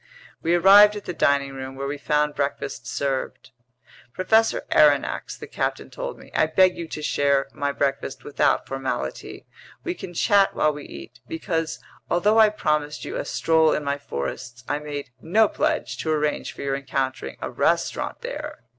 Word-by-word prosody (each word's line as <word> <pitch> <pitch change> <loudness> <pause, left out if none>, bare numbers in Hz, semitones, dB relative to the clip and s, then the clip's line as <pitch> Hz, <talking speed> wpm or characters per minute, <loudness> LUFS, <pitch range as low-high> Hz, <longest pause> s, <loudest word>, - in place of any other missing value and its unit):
We 170 +1 +2
arrived 200 +4 +8
at 205 - -7
the 180 - -4
dining 140 -3 +1
room, 135 0 -7
where 135 +1 -4
we 145 +1 -4
found 150 +1 +1
breakfast 140 -4 -3
served. 135 -3 -3 0.6
"Professor 220 +4 +2
Aronnax," 145 -2 +3
the - - -8
captain - - -3
told - - -5
me, - - -15
"I 155 - +3
beg 185 +3 +4
you 170 - -6
to 155 - -6
share 140 -2 +2
my 145 0 -1
breakfast 140 -1 -2
without 145 -2 +1
formality. 135 -1 -4 0.4
We 350 - -2
can 175 - -9
chat 200 +3 +3
while 155 0 +2
we 145 -1 -9
eat. 70 -1 -11
Because, 165 -1 -2 0.3
although 205 +6 +3
I 215 -1 +7
promised 150 -7 -1
you - - -5
a - - -2
stroll 160 -1 +3
in 150 - -1
my 140 0 -2
forests, 125 - -6
I 145 - -1
made 145 -3 -6
no 210 +7 +4
pledge - - -1
to 160 - -3
arrange 150 -1 -1
for - - -8
your 135 -1 -1
encountering 135 -1 -3
a - - -5
restaurant - - 0
there. - - -6
150 Hz, 175 wpm, -24 LUFS, 140-170 Hz, 0.6 s, arrived